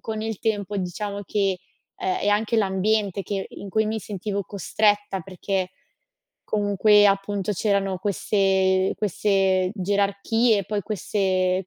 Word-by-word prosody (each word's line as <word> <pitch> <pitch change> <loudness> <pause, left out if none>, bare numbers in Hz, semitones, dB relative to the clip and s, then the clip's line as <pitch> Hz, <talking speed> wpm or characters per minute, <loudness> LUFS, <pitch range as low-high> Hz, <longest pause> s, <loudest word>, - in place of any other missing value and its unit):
con 220 -1 -4
il 220 -3 -3
tempo 205 -2 -2
diciamo 200 +2 -4
che, 195 -3 0 0.4
uhm, 380 -1 -3
è 290 - -1
anche 215 +3 +1
l'ambiente 200 0 +1
che 195 -1 -3
in 200 - -9
cui 220 +3 +1
mi 220 +1 -1
sentivo 200 0 -4
costretta, 205 0 0
perché 190 +1 -3 0.7
comunque, 205 0 +4
appunto, 200 0 0
c'erano 195 -1 0
queste 190 -1 +1
queste 190 -2 +1
gerarchie, 200 +3 +1
poi 205 +1 -2
queste 185 -3 0
200 Hz, 125 wpm, -24 LUFS, 190-210 Hz, 0.7 s, comunque